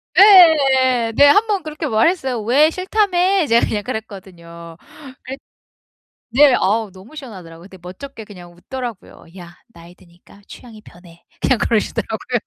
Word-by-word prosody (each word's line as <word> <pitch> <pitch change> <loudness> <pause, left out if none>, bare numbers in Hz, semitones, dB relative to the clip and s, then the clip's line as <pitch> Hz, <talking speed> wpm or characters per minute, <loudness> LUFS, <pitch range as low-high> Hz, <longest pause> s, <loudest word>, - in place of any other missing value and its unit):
네. 275 - +4
네. 285 - +5
한번 410 +4 +2
그렇게 310 0 -6
말했어요. 260 0 -1
"왜? 270 +8 +2
싫다며?" 375 -1 0
제가 235 0 +2
그냥 210 -1 -4
그랬거든요. 180 -7 -10 0.5
그랬 265 +2 -9 1.0
네. 275 0 +5
어우 210 +1 -1
너무 195 +11 -16
시원하더라고요. 185 - -12
근데 190 - -15
멋쩍게 220 +7 -11
그냥 180 -4 -15
웃더라고요. 240 +3 -10
"야, 175 -1 -13 0.2
나이 170 +1 -16
드니까 180 +2 -22
취향이 225 -3 -14
변해." 175 -2 -19 0.2
그냥 260 - +1
그러시더라고요. 220 -3 -3
235 Hz, 335 characters per minute, -17 LUFS, 185-295 Hz, 1.0 s, 네